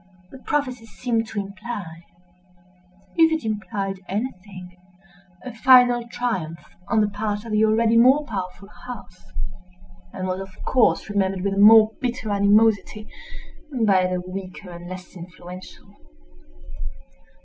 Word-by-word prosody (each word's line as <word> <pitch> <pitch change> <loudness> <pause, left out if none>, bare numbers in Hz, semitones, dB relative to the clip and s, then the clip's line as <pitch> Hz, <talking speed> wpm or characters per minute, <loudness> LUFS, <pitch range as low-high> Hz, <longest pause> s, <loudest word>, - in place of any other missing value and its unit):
The 265 - -11
prophecy 255 -5 -2
seemed 230 -1 -2
to 215 - -4
imply—if 180 - -5
it 320 -7 -1
implied 195 -2 -3
anything—a 185 -1 -8
final 245 0 +5
triumph 190 -10 -3 0.3
on 220 -2 +2
the 210 - +2
part 205 +1 -3
of 230 - -7
the 215 0 +3
already 225 +1 +3
more 265 +5 +5
powerful 195 -4 -6 0.2
house; 205 -6 -10 0.9
and 185 -1 -4
was 185 0 -2
of 190 -1 -10
course 255 -3 +2
remembered 195 -2 0
with 200 +1 -1
the 195 - -1
more 215 +1 +8
bitter 245 -4 -2
animosity 210 +1 +2 0.8
by 190 -3 +4
the 180 0 -2
weaker 185 0 -8
and 175 0 -9
less 185 0 -9
influential. 180 +1 -11
200 Hz, 120 wpm, -23 LUFS, 185-225 Hz, 0.9 s, more